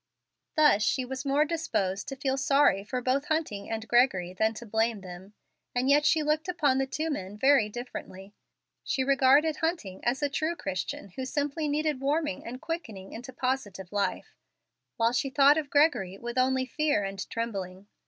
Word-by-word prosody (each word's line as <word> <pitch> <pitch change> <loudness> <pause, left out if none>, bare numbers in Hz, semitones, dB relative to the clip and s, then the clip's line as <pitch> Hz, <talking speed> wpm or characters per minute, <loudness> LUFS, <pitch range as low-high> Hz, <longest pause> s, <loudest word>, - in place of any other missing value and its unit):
Thus 300 -10 +5
she 255 +4 +1
was 265 +2 -6
more 285 +2 +3
disposed 285 - -2
to 270 - -5
feel 265 0 -1
sorry 275 -7 +3
for 250 +5 -3
both 270 +3 +1
Hunting 305 -12 -2
and 225 0 -4
Gregory 200 -7 +2
than 220 +4 +1
to 235 - -8
blame 220 -1 0
them. 190 +2 -11 0.4
And 255 +3 +2
yet 295 +1 +4
she 315 - +3
looked 305 +2 0
upon 295 -7 +1
the 270 - 0
two 315 +4 -2
men 195 -6 -5
very 265 -3 +4
differently. 205 -4 -8 0.5
She 265 - 0
regarded 275 +3 +4
Hunting 320 - -3
as 255 +4 0
a - - +3
true 315 +4 -1
Christian 195 - -4
who 260 +8 -6
simply 290 +3 -2
needed 295 -2 -1
warming 290 - -1
and 250 +2 -6
quickening 260 - -6
into 245 +3 -8
positive 245 -8 -3
life, 200 -2 -2 0.6
while 230 0 +3
she 260 +2 0
thought 285 +2 +5
of 290 -3 -5
Gregory 285 - +2
with 235 +2 -6
only 260 0 +2
fear 295 -4 0
and 195 0 -5
trembling. 195 -4 -4
260 Hz, 175 wpm, -28 LUFS, 205-290 Hz, 0.6 s, Thus